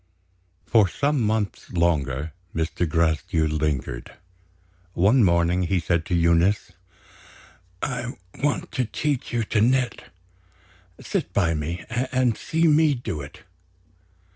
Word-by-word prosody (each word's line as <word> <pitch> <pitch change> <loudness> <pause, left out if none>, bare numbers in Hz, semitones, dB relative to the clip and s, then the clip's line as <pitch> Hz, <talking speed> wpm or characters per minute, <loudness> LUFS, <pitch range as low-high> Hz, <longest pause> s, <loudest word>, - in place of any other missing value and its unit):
For 110 -4 +4
some 145 +6 0
months 110 -2 -1
longer, 75 -4 0 0.2
Mr. 80 +1 -1
Gracedieu 80 +1 +1
lingered. 75 -5 -2 0.8
One 105 +9 +4
morning, 85 0 +3
he 90 +1 +1
said 85 0 0
to 90 - 0
Eunice: 85 +5 +2 1.1
"I 125 -1 -3 0.3
want 145 - 0
to 130 -2 0
teach 145 +3 -2
you 120 -1 0
to 105 0 0
knit. 125 0 +1 0.9
Sit 85 - -3
by 85 -5 +2
me, 85 +3 -4 0.3
and 125 -3 +2
see 165 +1 +1
me 155 -1 +4
do 110 - -4
it." 70 - -11
90 Hz, 115 wpm, -24 LUFS, 85-120 Hz, 1.1 s, For